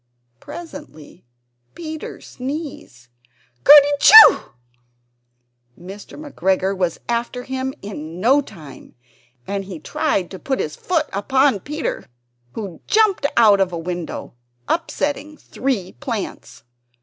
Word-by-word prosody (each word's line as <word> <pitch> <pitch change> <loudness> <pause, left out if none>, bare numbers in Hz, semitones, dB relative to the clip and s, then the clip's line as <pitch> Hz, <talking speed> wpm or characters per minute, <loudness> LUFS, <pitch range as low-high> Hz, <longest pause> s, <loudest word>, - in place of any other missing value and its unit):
Presently 285 - -11 0.5
Peter 315 -2 -8
sneezed 265 - -8 0.6
"Kerty 290 0 +9
schoo!" 440 +6 +8 1.3
Mr. 195 +4 -11
McGregor 190 - -1
was 180 -3 -2
after 240 +1 -3
him 260 0 -4
in 170 -4 -8
no 260 +8 +4
time, 155 - -14 0.5
and 200 0 -3 0.2
tried 180 -3 -1
to 190 - -8
put 265 -1 -2
his 150 - -3
foot 330 -4 -1
upon 260 +4 +2
Peter, 300 - -5 0.5
who 195 -7 -7
jumped 425 -9 +2
out 210 -4 +6
of 185 -1 +1
a 170 - -4
window, 175 0 -6 0.3
upsetting 300 -2 -2
three 240 -9 -3
plants. 235 -8 -7
235 Hz, 105 wpm, -20 LUFS, 185-290 Hz, 1.3 s, Kerty